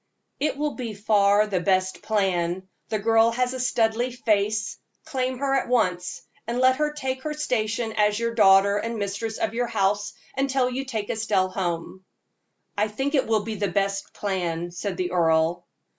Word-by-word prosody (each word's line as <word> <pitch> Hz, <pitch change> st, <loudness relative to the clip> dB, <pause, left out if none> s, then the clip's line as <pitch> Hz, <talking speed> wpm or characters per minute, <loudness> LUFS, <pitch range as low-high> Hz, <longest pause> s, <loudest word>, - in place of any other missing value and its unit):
"It 295 Hz, -1 st, 0 dB
will 295 Hz, 0 st, -1 dB
be 235 Hz, -5 st, -5 dB
far 205 Hz, 0 st, +3 dB
the 200 Hz, -3 st, -1 dB
best 185 Hz, 0 st, +1 dB
plan. 185 Hz, -3 st, 0 dB, 0.2 s
The 215 Hz, -, 0 dB
girl 225 Hz, +2 st, +4 dB
has 250 Hz, +1 st, 0 dB
a 260 Hz, -, -4 dB
Studleigh 240 Hz, -1 st, +1 dB
face; 215 Hz, -4 st, 0 dB, 0.3 s
claim 255 Hz, -1 st, -2 dB
her 270 Hz, +1 st, 0 dB
at 270 Hz, -, +1 dB
once, 180 Hz, -7 st, 0 dB, 0.2 s
and 235 Hz, +1 st, -2 dB
let 255 Hz, +1 st, +4 dB
her 300 Hz, 0 st, +1 dB
take 265 Hz, -3 st, -3 dB
her 300 Hz, +2 st, -4 dB
station 225 Hz, -5 st, -1 dB
as 210 Hz, -1 st, +2 dB
your 230 Hz, 0 st, -1 dB
daughter 200 Hz, -2 st, +5 dB
and 230 Hz, +2 st, -3 dB
mistress 205 Hz, +2 st, -3 dB
of -, -, -1 dB
your 240 Hz, +1 st, 0 dB
house 205 Hz, -1 st, 0 dB, 0.2 s
until 265 Hz, -1 st, +1 dB
you 265 Hz, +2 st, -3 dB
take 220 Hz, -5 st, -3 dB
Estelle 205 Hz, -4 st, +1 dB
home." 185 Hz, 0 st, -4 dB, 0.7 s
"I 210 Hz, +1 st, +1 dB
think 270 Hz, +7 st, -3 dB
it 270 Hz, -3 st, +2 dB
will 220 Hz, -2 st, +2 dB
be 225 Hz, -, -4 dB
the 205 Hz, -1 st, -1 dB
best 195 Hz, +1 st, -1 dB
plan," 175 Hz, -4 st, -2 dB
said 180 Hz, +2 st, -4 dB
the 180 Hz, -1 st, -2 dB
earl. 165 Hz, 0 st, +2 dB
215 Hz, 175 wpm, -25 LUFS, 195-250 Hz, 0.7 s, daughter